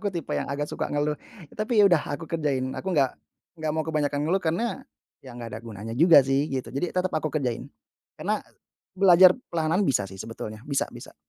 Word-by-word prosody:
aku 205 Hz, -2 st, -1 dB
tipe 170 Hz, -5 st, -5 dB
yang -, -, -2 dB
agak 145 Hz, +1 st, -2 dB
suka -, -, -4 dB
ngeluh, 145 Hz, +1 st, 0 dB, 0.4 s
tapi 215 Hz, +1 st, 0 dB
ya 205 Hz, -, +8 dB
udah, 175 Hz, -5 st, +4 dB
aku 165 Hz, -, -9 dB
kerjain. 140 Hz, -5 st, -1 dB
Aku 190 Hz, -, -4 dB
nggak 140 Hz, -7 st, +3 dB, 0.5 s
nggak 155 Hz, -1 st, -1 dB
mau 160 Hz, -1 st, -1 dB
kebanyakan 145 Hz, -2 st, 0 dB
ngeluh 185 Hz, +4 st, +1 dB
karena 225 Hz, +11 st, -1 dB, 0.4 s
ya 130 Hz, -, -11 dB
nggak 120 Hz, -1 st, -7 dB
ada 110 Hz, -, -6 dB
gunanya 110 Hz, 0 st, -7 dB
juga 165 Hz, +5 st, +7 dB
sih 135 Hz, +2 st, +1 dB
gitu. 130 Hz, -2 st, -3 dB
Jadi 170 Hz, +5 st, -1 dB
tetap 185 Hz, 0 st, 0 dB
aku 155 Hz, 0 st, 0 dB
kerjain. 130 Hz, -6 st, -2 dB, 0.5 s
Karena -, -, -1 dB, 0.6 s
belajar 185 Hz, -1 st, +8 dB, 0.2 s
perlahan-lahan 165 Hz, +4 st, +1 dB
bisa 125 Hz, -6 st, +2 dB
sih 95 Hz, -, -11 dB
sebetulnya, 110 Hz, +1 st, -7 dB
bisa 140 Hz, -1 st, 0 dB
bisa. -, -, -11 dB
155 Hz, 195 wpm, -26 LUFS, 135-175 Hz, 0.6 s, ya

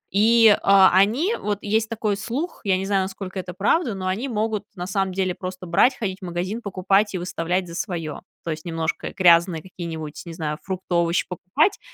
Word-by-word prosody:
И, 220 Hz, +1 st, +6 dB
а, 195 Hz, -1 st, +6 dB
они- 240 Hz, -, +3 dB
вот 205 Hz, -1 st, -2 dB
есть 220 Hz, +1 st, 0 dB
такой 215 Hz, -3 st, -1 dB
слух, 275 Hz, -, -4 dB
я 190 Hz, -2 st, +3 dB
не 190 Hz, -, -3 dB
знаю, 195 Hz, -1 st, +1 dB
насколько 190 Hz, 0 st, -6 dB
это 180 Hz, -1 st, -6 dB
правда- 225 Hz, -, +1 dB
но 185 Hz, -1 st, -5 dB
они 210 Hz, +9 st, -1 dB
могут, 215 Hz, -2 st, -1 dB
на 180 Hz, -1 st, -5 dB
самом 195 Hz, 0 st, -1 dB
деле, 185 Hz, -1 st, -1 dB
просто 185 Hz, 0 st, -7 dB
брать, 195 Hz, +10 st, +3 dB
ходить 195 Hz, -4 st, -3 dB
в -, -, -7 dB
магазин, 180 Hz, +6 st, -3 dB
покупать, 195 Hz, +1 st, +1 dB
и -, -, 0 dB
выставлять 180 Hz, +1 st, -2 dB
за 170 Hz, -, -9 dB
свое. 170 Hz, -5 st, -4 dB, 0.2 s
То 165 Hz, -, -2 dB
есть, 155 Hz, 0 st, -5 dB
немножко 165 Hz, -1 st, -3 dB
грязные 170 Hz, -2 st, +4 dB
какие-нибудь, 165 Hz, -4 st, -7 dB
не 165 Hz, -, -6 dB
знаю, 155 Hz, 0 st, -4 dB
фрукты, 190 Hz, -1 st, -5 dB
овощи 170 Hz, 0 st, +2 dB
покупать, 190 Hz, -, 0 dB
190 Hz, 195 wpm, -23 LUFS, 175-210 Hz, 0.2 s, И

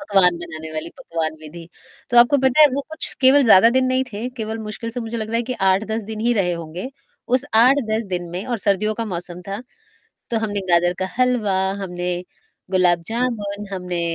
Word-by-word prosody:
पकवान 195 Hz, -10 st, +3 dB
बनाने 160 Hz, -2 st, -7 dB
वाली 155 Hz, +1 st, -4 dB
पकवान 160 Hz, -1 st, -3 dB
विधि। 165 Hz, +2 st, -11 dB, 0.4 s
तो 240 Hz, -, +1 dB
आपको 240 Hz, +4 st, +6 dB
पता 265 Hz, +3 st, +3 dB
है 300 Hz, -, +10 dB
वो 280 Hz, -, 0 dB
कुछ 315 Hz, -, -4 dB
केवल 270 Hz, +2 st, +6 dB
ज़्यादा 225 Hz, 0 st, +7 dB
दिन 260 Hz, -, +4 dB
नहीं 255 Hz, +1 st, +1 dB
थे, 220 Hz, +5 st, -4 dB
केवल 220 Hz, +1 st, -3 dB
मुश्किल 230 Hz, +2 st, -5 dB
से 245 Hz, +2 st, -5 dB
मुझे 230 Hz, 0 st, -5 dB
लग 220 Hz, -1 st, -4 dB
रहा 230 Hz, -, -1 dB
है 235 Hz, -, +1 dB
कि 255 Hz, +2 st, -4 dB, 0.2 s
8-10 220 Hz, +3 st, 0 dB
दिन 215 Hz, 0 st, -5 dB
ही 240 Hz, -, +4 dB
रहे 180 Hz, -2 st, +1 dB
होंगे, 170 Hz, +7 st, -6 dB, 0.4 s
उस 255 Hz, +2 st, +2 dB, 0.2 s
8-10 230 Hz, -3 st, +3 dB
दिन 175 Hz, -1 st, -2 dB
में 180 Hz, +3 st, -5 dB
और 240 Hz, -3 st, -2 dB
सर्दियों 210 Hz, +1 st, +1 dB
का 230 Hz, -, -3 dB
मौसम 175 Hz, +1 st, -7 dB
था। 200 Hz, +3 st, -4 dB, 0.7 s
तो 230 Hz, -, +1 dB
हमने 205 Hz, -2 st, -2 dB
गाजर 175 Hz, +1 st, +4 dB
का 185 Hz, -, -1 dB
हलवा, 245 Hz, -6 st, +2 dB, 0.3 s
हमने 180 Hz, -1 st, -3 dB, 0.6 s
गुलाब 175 Hz, -2 st, +3 dB
जामुन, 215 Hz, -4 st, -2 dB
हमने 180 Hz, -2 st, -3 dB
210 Hz, 200 wpm, -21 LUFS, 180-240 Hz, 0.7 s, है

